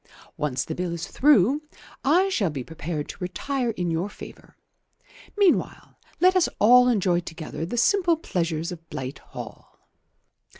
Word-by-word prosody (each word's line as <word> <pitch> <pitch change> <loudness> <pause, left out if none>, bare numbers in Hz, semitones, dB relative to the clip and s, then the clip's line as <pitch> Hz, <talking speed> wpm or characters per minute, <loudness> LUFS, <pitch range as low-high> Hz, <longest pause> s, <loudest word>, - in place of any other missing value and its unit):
Once 135 -4 -2
the 160 - -4
Bill 175 0 -3
is 170 0 -5
through, 280 0 +4 0.4
I 345 +8 +4
shall 205 - +1
be 140 -4 -5
prepared 155 0 -5
to - - -8
retire 250 +7 -2
in 180 -6 -2
your 170 +5 -1
favour. - - -13 0.8
Meanwhile 400 -4 +1 0.2
let 370 +1 +5
us 365 -3 +3
all 250 +3 +6
enjoy 190 -7 +2
together 165 -1 -6
the 240 - -4
simple 345 - +3
pleasures 170 - -2
of 165 -2 -10
Blight 130 +1 -6
Hall." - - -11
180 Hz, 145 wpm, -25 LUFS, -, 0.8 s, all